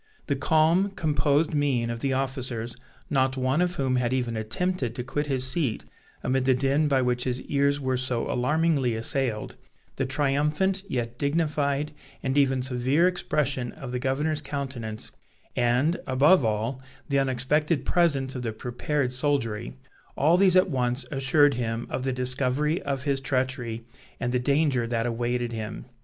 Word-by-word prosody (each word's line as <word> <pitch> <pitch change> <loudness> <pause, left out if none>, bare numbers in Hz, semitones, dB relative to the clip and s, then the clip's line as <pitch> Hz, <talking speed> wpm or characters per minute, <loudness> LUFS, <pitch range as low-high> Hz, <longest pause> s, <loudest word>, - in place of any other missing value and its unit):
The 140 - 0
calm, 160 +7 +3
composed 150 -3 +1
mien 135 -6 +1
of 115 - -4
the 135 +3 -1
officers, 130 -3 -2 0.3
not 130 -1 +1
one 130 +5 +1
of 180 0 0
whom 130 -2 0
had 125 0 0
even 125 -3 -1
attempted 120 +4 -2
to 125 - -3
quit 145 +4 -2
his 130 -2 0
seat 130 -4 0 0.4
amid 130 0 +1
the 130 -1 +4
din 140 +4 +2
by 135 -3 +2
which 125 0 0
his 125 -1 -1
ears 140 0 +1
were 130 -2 0
so 125 -2 -1
alarmingly 140 -1 +1
assailed, 115 0 -1 0.4
the 135 - 0
triumphant, 150 +8 +1
yet 120 - -3
dignified, 150 -1 0 0.3
and 130 0 -1
even 135 -2 +3
severe 130 +6 +2
expression 145 -8 -1
of 135 -2 -8
the 125 - -2
governor's 145 +4 0
countenance; 130 -7 -4 0.4
and, 125 +8 +2
above 140 +6 +5
all, 115 +4 -1 0.3
the 140 -2 +2
unexpected 135 +3 +1
presence 145 -7 +2
of 125 - -4
the 115 -2 -3
prepared 125 +4 -2
soldiery, 125 -4 -1 0.4
all 155 +5 +4
these 185 0 +5
at 185 -1 +4
once 125 -1 0
assured 140 +1 +4
him 115 -1 -2
of - - -2
the 130 +1 -1
discovery 130 +5 0
of 135 -2 -3
his 140 -2 0
treachery, 130 -4 -2 0.3
and 120 0 -2
the 125 - +2
danger 140 -2 +2
that 115 -1 -1
awaited 120 0 -1
him. 110 -1 -5
130 Hz, 160 wpm, -26 LUFS, 125-145 Hz, 0.4 s, above